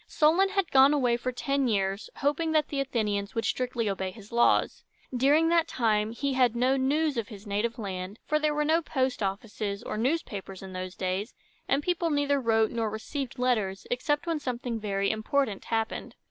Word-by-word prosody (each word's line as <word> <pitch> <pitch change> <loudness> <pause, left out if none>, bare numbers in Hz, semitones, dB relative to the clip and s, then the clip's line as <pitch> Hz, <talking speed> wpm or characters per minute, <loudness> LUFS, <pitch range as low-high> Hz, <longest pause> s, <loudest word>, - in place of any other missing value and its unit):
Solon 335 +6 +3
had 390 -3 -1
gone 270 +2 +6
away 250 -4 +2
for 255 +2 -2
ten 275 +2 0
years, 195 -2 -1
hoping 315 +3 0
that 310 -1 +2
the 280 - -2
Athenians 210 -6 -1
would 225 0 -1
strictly 245 -1 -1
obey 190 -1 -2
his 210 +2 -13
laws. 235 0 +2 0.3
During 290 +6 +4
that 335 -1 +3
time 215 -3 +1
he 275 +4 -2
had 250 -3 +3
no 255 +3 +3
news 285 +2 +1
of 225 -3 -1
his 205 -2 -11
native 210 +3 -1
land; 195 -2 -5
for 305 - +1
there 305 -1 +1
were 300 0 +1
no 320 +2 +3
post 265 -6 -1
offices 200 +1 -3
or 215 - -4
newspapers 210 - -2
in 190 -1 -8
those 185 0 -5
days, 190 +4 -3 0.3
and 275 +2 +1
people 345 -1 0
neither 285 -2 +1
wrote 225 -2 +2
nor 225 -2 -1
received 250 +5 -5
letters 215 -6 0
except 295 +5 0
when 330 -2 -1
something 245 -3 -3
very 200 -2 0
important 220 0 -1
happened. 225 -1 -2
240 Hz, 190 wpm, -28 LUFS, 210-285 Hz, 0.3 s, gone